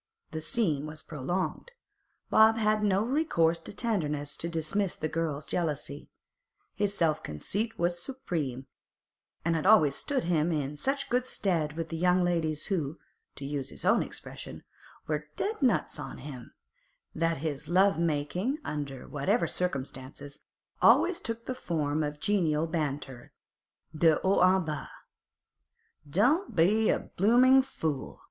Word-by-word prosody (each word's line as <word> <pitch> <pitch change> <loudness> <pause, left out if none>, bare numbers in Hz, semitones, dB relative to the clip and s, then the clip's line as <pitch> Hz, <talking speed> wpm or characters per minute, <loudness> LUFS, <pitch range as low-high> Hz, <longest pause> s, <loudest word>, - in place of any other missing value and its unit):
The 160 - -4
scene 155 -4 0
was 155 0 -7
prolonged. 175 - -3 0.6
Bob 220 +1 +6
had 215 -1 +2
no 200 -1 +2
recourse 195 - +1
to - - -9
tenderness 150 - -2
to 170 - -4
dismiss 170 +4 -1
the 155 - -2
girl's 155 -2 -2
jealousy. 150 -4 -3 0.6
His 205 0 -1
self 155 -2 +2
conceit 205 - -3
was 175 0 0
supreme, 155 - -4 0.8
and 170 -1 +2
had 160 +3 0
always 180 -10 +6
stood 275 - -1
him 170 -1 +1
in 150 -2 -2
such 275 - -1 0.2
stead 165 -11 -1
with 165 -1 -3
the 165 - -4
young 180 +1 +3
ladies 160 -3 0
who, 160 -5 -2 0.4
to 140 - -7
use 140 -2 -3
his - - -6
own - - +4
expression, - - -7 0.4
were 150 -1 -2
'dead 430 -2 -2
nuts 255 -4 +1
on - - -6
him,' 130 -4 -9 0.6
that 165 0 0
his 150 0 -4
love 190 0 +4
making, 170 - 0
under 140 -3 -5
whatever 190 - +1
circumstances, 140 -3 -4 0.4
always 355 -1 +5
took 230 0 -5
the 255 - -2
form 155 - -1
of 150 -1 -3
genial 165 -5 +1
banter 145 -6 -4 0.6
de 160 0 +5
haut 190 -1 +4 0.2
en - - -6
bas. 150 -2 -4 1.2
'Don't 265 - +2
be 210 +7 +4
a - - +3
bloomin' 250 +7 +4
fool! 160 - -4
165 Hz, 140 wpm, -29 LUFS, 150-205 Hz, 1.2 s, Bob